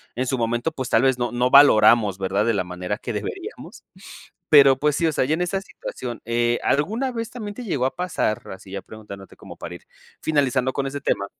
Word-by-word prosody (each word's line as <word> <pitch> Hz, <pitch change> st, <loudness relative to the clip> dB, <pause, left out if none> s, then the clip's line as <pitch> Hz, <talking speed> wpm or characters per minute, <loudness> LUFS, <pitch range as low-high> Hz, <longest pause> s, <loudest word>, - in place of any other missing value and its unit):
en 130 Hz, +2 st, -1 dB
su 130 Hz, 0 st, -1 dB
momento, 120 Hz, +6 st, -1 dB
pues, 130 Hz, -4 st, -5 dB
tal 115 Hz, -, +3 dB
vez 130 Hz, -2 st, +3 dB
no 120 Hz, -1 st, -2 dB
no 125 Hz, +1 st, +1 dB
valoramos, 110 Hz, -7 st, +6 dB
¿verdad? 95 Hz, +2 st, 0 dB
De 115 Hz, -, +2 dB
la 100 Hz, -, 0 dB
manera 90 Hz, +3 st, -4 dB
que 120 Hz, -1 st, -6 dB
deberíamos. 105 Hz, -1 st, -7 dB, 0.7 s
Pero 140 Hz, -3 st, +7 dB
pues, 150 Hz, +1 st, +1 dB
sí 170 Hz, -, +1 dB
o 160 Hz, -, +1 dB
sea, 130 Hz, -, +1 dB
ya 150 Hz, -, 0 dB
en 170 Hz, -, -1 dB
esa 190 Hz, +2 st, -1 dB
situación, 125 Hz, -, -8 dB
eh, 120 Hz, +1 st, +1 dB
¿alguna 220 Hz, -, 0 dB
vez, 230 Hz, -1 st, -5 dB
también 210 Hz, -4 st, -7 dB
te 250 Hz, -, -8 dB
llegó 140 Hz, -, -1 dB
a 135 Hz, -, -3 dB
pasar? 180 Hz, -11 st, -1 dB
Así 95 Hz, 0 st, -12 dB
ya 100 Hz, 0 st, -5 dB
preguntándote 100 Hz, -3 st, -12 dB
como -, -, -12 dB
para -, -, -8 dB
ir -, -, -12 dB, 0.4 s
finalizando 130 Hz, -4 st, +1 dB
con 140 Hz, 0 st, -2 dB
ese 140 Hz, +1 st, -5 dB
tema. 100 Hz, -6 st, -1 dB
130 Hz, 220 wpm, -22 LUFS, 110-150 Hz, 0.7 s, Pero